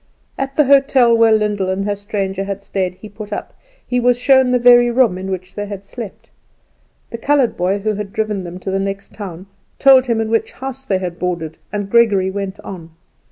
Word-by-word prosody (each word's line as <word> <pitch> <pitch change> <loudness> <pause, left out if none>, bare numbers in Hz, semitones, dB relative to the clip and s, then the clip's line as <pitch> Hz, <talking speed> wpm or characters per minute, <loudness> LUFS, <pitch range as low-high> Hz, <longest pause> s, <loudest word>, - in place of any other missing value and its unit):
At 270 0 -4
the 300 - +4
hotel 270 -3 +4
where 230 -1 +4
Lyndall 210 -3 +1
and 190 +1 -1
her 205 0 -1
stranger 195 -1 -3
had 200 0 -5
stayed 185 -2 -2
he 215 - -11
put 210 0 -10
up; - - -5 0.3
he 250 - 0
was 245 0 +3
shown 260 0 +4
the 250 - +4
very 240 0 +6
room 240 -5 +3
in 190 +1 -6
which 185 0 -5
they 205 0 -5
had 200 -1 -8
slept. 220 -1 -9 0.8
The 230 - -6
coloured 275 -1 +2
boy 185 +3 0
who 215 +2 -1
had 205 -1 -5
driven 215 -3 -2
them 175 0 -7
to 190 - -4
the 195 - 0
next 195 0 -4
town 190 -3 -8 0.3
told 265 -1 +6
him 230 -2 +1
in 220 0 -2
which 225 - 0
house 270 0 -7
they 195 -7 +1
had 180 -2 -5
boarded, 170 -3 -3
and 205 -1 -3
Gregory 200 -4 +3
went 195 0 -5
on. 170 -4 -9
205 Hz, 210 wpm, -18 LUFS, 190-240 Hz, 0.8 s, very